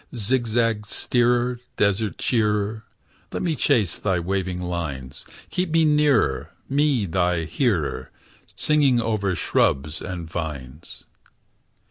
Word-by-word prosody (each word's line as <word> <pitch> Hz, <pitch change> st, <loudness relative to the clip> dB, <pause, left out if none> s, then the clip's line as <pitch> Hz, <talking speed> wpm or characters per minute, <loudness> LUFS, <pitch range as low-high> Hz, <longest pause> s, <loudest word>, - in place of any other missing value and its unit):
Zigzag 115 Hz, -1 st, +1 dB
steerer, 120 Hz, +1 st, +1 dB, 0.2 s
desert 100 Hz, +1 st, +1 dB
cheerer, 105 Hz, -2 st, 0 dB, 0.5 s
Let -, -, -3 dB
me 165 Hz, -3 st, 0 dB
chase 115 Hz, -, +2 dB
thy 95 Hz, -3 st, +1 dB
waving 95 Hz, 0 st, -2 dB
lines; 80 Hz, -8 st, -4 dB, 0.2 s
Keep 180 Hz, -1 st, -1 dB
me 165 Hz, 0 st, +3 dB
nearer, 150 Hz, -4 st, +3 dB, 0.2 s
me 140 Hz, -5 st, +2 dB
thy 90 Hz, -1 st, +1 dB
hearer, 85 Hz, -, -1 dB, 0.5 s
Singing 145 Hz, -5 st, +3 dB
over 105 Hz, -5 st, 0 dB
shrubs 75 Hz, 0 st, +1 dB
and 90 Hz, -3 st, -5 dB
vines. 75 Hz, -3 st, -6 dB
105 Hz, 105 wpm, -23 LUFS, 85-125 Hz, 0.5 s, me